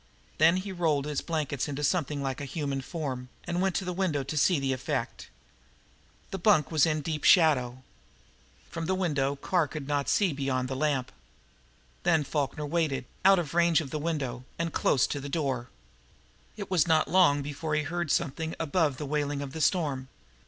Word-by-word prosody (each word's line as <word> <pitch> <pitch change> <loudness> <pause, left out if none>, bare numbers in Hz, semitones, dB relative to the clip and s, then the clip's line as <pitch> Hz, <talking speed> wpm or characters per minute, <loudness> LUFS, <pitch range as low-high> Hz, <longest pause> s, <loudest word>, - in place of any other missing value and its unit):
Then 165 +3 +5
he 195 +1 -4
rolled 160 -6 0
his 150 -2 -2
blankets 150 -5 -2
into 145 0 -4
something 145 -3 0
like 135 0 -3
a - - -4
human 140 -2 -3
form, 130 -5 -5 0.2
and 175 +1 -1
went 190 -1 +1
to 190 - -1
the 180 - -2
window 170 -7 0
to 135 +4 -5
see 150 +2 +3
the 135 -1 0
effect. 130 - -4 1.0
The 195 - -4
bunk 170 -7 +3
was 155 -1 +4
in 155 -1 0
deep 150 0 -4
shadow. 130 -8 +4 0.9
From 165 -1 -4
the 190 - +1
window 145 -7 0
Corporal 140 - -13
Carr 175 -5 +2
could 140 0 -7
not 145 -1 0
see 195 -6 +2
beyond 130 -2 -1
the 135 - -3
lamp. 135 -3 0 0.9
Then 165 -3 +3
Falkner 150 +1 -2
waited, 150 -4 -1 0.2
out 195 +1 +7
of 165 -4 -2
range 170 -1 +4
of 150 -5 -5
the 155 - -2
window, 140 -6 -3
and 165 -1 -2
close 130 - +3
to 145 - -3
the 140 +1 -6
door. 135 -6 -2 0.9
It 200 -2 -7
was 170 -5 +3
not 160 -1 +3
long 170 -6 +4
before 150 +2 -3
he 155 - +1
heard 170 +2 -3
something 160 +1 -1
above 160 -3 +1
the 150 - -5
wailing 145 0 -1
of 135 -1 -8
the 160 - -4
storm. 145 -6 +1
150 Hz, 190 wpm, -28 LUFS, 140-170 Hz, 1.0 s, out